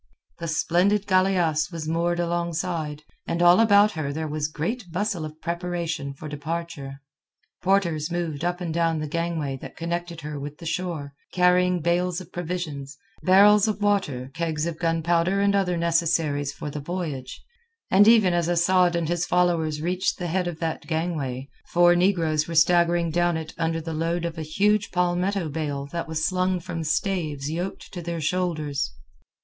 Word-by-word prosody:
The 170 - -4
splendid 180 +6 +2
galeasse 185 -5 +2
was 165 -2 -5
moored 170 +2 0
alongside, 170 -3 -2 0.2
and 170 - -1
all 175 +2 +6
about 210 -1 +6
her 155 -5 -3
there 155 +2 -3
was 150 0 -2
great 175 +6 -4
bustle 195 -1 -1
of 155 0 -9
preparation 170 -5 -3
for 155 - -8
departure. 150 -2 -5 0.6
Porters 175 -5 +1
moved 170 -4 -3
up 175 +1 -1
and 170 -2 -3
down 165 -1 +1
the 155 - -2
gangway 160 -3 -2
that - - -11
connected 170 0 -4
her 150 -1 -5
with 145 +1 -7
the 170 - -11
shore, 165 -4 -3 0.2
carrying 180 0 +3
bales 175 +2 +1
of 185 -1 -12
provisions, 160 -5 -4 0.2
barrels 205 +3 +6
of 210 -2 -1
water, 190 -12 0
kegs 160 -1 -2
of 170 -2 -4
gunpowder, 170 +3 +1
and 200 0 +3
other 185 -3 +1
necessaries 165 -4 +1
for 145 0 -6
the 150 - -5
voyage, 150 -5 -5 0.5
and 200 +2 +6
even 215 -6 +6
as 175 -1 +1
Asad 175 +1 +3
and 170 -2 0
his 175 +1 -1
followers 165 -4 +1
reached 180 +2 0
the 180 - -4
head 180 +1 0
of 175 -3 -4
that 165 -1 -3
gangway, 155 -6 -2 0.2
four 175 0 +5
negroes 165 -4 +2
were 165 - -5
staggering 170 0 +4
down 175 0 +1
it 160 0 -6
under 165 0 0
the 165 0 -5
load 165 +2 -1
of 165 -1 -4
a - - -3
huge 205 +7 +1
palmetto 180 +1 0
bale 145 -2 -3
that 170 -1 -3
was 160 -1 -1
slung 185 0 +1
from 170 -1 -5
staves 155 -4 -1
yoked 175 +4 -5
to 175 - -5
their 170 0 -4
shoulders. 155 - -1
170 Hz, 170 wpm, -25 LUFS, 155-180 Hz, 0.6 s, all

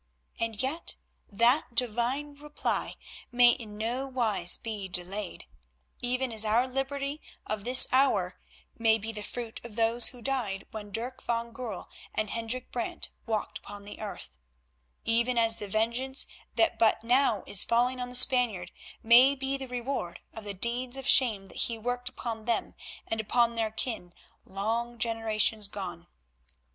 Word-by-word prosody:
And 225 -2 -2
yet 310 +6 -2 0.3
that 235 +4 +2
Divine 250 +5 0
reply 295 +1 -3 0.4
may 245 0 +7
in 215 -3 -6
no 240 +5 -2
wise 220 -9 +1
be 215 -4 -5
delayed; 185 +2 -3 0.6
even 250 +1 -1
as 220 -1 +4
our 225 +4 +2
liberty 275 +2 -3 0.2
of 215 -1 -4
this 255 +1 +8
hour 270 +2 +2 0.4
may 225 -1 +4
be 225 +1 -5
the 215 -2 -6
fruit 230 +2 -6
of 235 -3 -10
those 230 +1 +6
who 245 -2 -8
died 235 -8 -2
when 210 -2 -7
Dirk 240 +5 -5
van 235 0 -2
Goorl 225 -6 -6 0.3
and 215 -1 -1
Hendrik 230 +2 -3
Brant 240 -2 -3 0.2
walked 220 -2 -2
upon 205 0 -10
the 205 - -9
earth; 185 - -7 0.7
even 235 +2 +1
as 225 -1 +3
the 205 - -5
vengeance 235 +6 0 0.3
that 335 - +2
but 225 -1 +3
now 240 -3 +2
is 195 - +3
falling 245 +2 +1
on 250 0 -4
the 250 - -9
Spaniard 240 -8 +4 0.3
may 245 +5 +7
be 270 0 -2
the 270 -1 -5
reward 245 -7 -4
of 220 -1 -9
the 200 -1 -2
deeds 245 +5 -1
of 270 - -6
shame 215 -9 +4
that - - -12
he 230 - -4
worked 245 +2 -3
upon 230 -3 -6
them 235 - -1 0.3
and 225 0 -2
upon 235 +2 +2
their 225 -1 0
kin 215 -6 -4 0.3
long 230 +5 -2
generations 220 -2 +2
gone. 175 -4 -7
230 Hz, 155 wpm, -29 LUFS, 215-250 Hz, 0.7 s, this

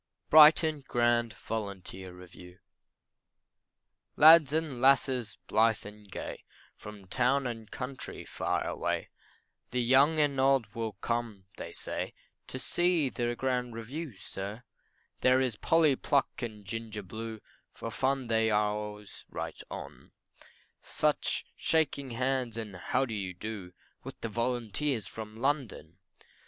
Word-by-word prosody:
BRIGHTON 155 -1 +7
GRAND 120 -1 +2
VOLUNTEER 95 -4 -6
REVIEW. 90 0 -13 1.6
Lads 155 -2 +8
and 155 -5 -1
lasses, 130 -4 +3
blithe 110 0 +2
and 105 0 -12
gay, - - -6 0.3
From 105 -2 -11
town 130 +6 +1
and 115 -3 -5
country 130 +1 -6
far - - -2
away, - - -2 0.6
The 125 - -1
young 140 +6 +5
and 145 -3 +2
old 130 -6 +3
will 115 -2 -3
come, 115 -1 -3
they - - -6
say, - - -5 0.3
To - - -5
see 170 +1 +2
the 120 -1 -2
grand 125 -2 -1
review, 130 +4 -6
sir 100 +6 -7 0.6
There 130 0 +4
is 130 -4 0
Polly 155 +3 +3
Pluck 140 +1 0
and 110 -4 -6
Ginger 110 0 -5
Blue, 110 +3 -6 0.3
For 115 - -7
fun 135 +2 0
they 110 -1 +2
are 105 -1 +2
always 105 -1 -7
right - - -5
on, - - -9 0.7
Such - - 0
shaking 145 -4 0
hands 125 -1 -1
and 105 -4 -5
how 95 +8 0
do 115 - -6
you 95 -3 -4
do 100 -2 -6 0.3
With - - -9
the 115 - -3
volunteers 120 +1 -1
from 110 -1 -8
London. 115 - -2
120 Hz, 130 wpm, -30 LUFS, 105-135 Hz, 1.6 s, Lads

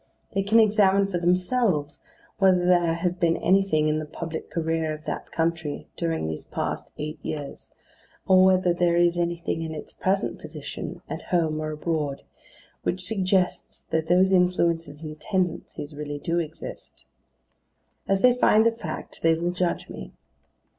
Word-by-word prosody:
They 195 - +1
can 210 +4 +4
examine 200 -2 +4
for 190 -3 -2
themselves 180 - +1 0.4
whether 185 -2 +4
there 175 -2 +3
has 175 +1 0
been 170 -2 +1
anything 185 -4 +3
in 155 0 +1
the 155 - -5
public 160 +1 -6
career 160 -1 -1
of 155 - -14
that - - -5
country 160 -3 -2
during 165 - -1
these 80 -1 -4
past - - -4
eight 155 +1 -5
years, 145 -2 -6 0.6
or 185 0 +6
whether 185 -1 +4
there 175 0 +2
is 175 0 +3
anything 170 -1 -1
in 160 -1 -4
its 150 - -8
present 195 +1 -1
position, - - -7
at - - -5
home 160 -3 +1
or 155 0 -3
abroad, 150 -2 -2 0.6
which 185 0 -2
suggests 185 -3 0
that 160 0 0
those 185 +2 +4
influences 170 -4 +1
and 155 -1 -7
tendencies 175 -4 -2
really 145 0 -5
do 165 +4 -1
exist. 160 -2 -8 1.0
As 195 0 +2
they 250 -1 +6
find 220 -3 +4
the 230 - +5
fact, 180 -9 -7
they 165 0 +4
will 170 +2 -1
judge 180 -1 -1
me. - - -9
170 Hz, 155 wpm, -25 LUFS, 155-185 Hz, 1.0 s, or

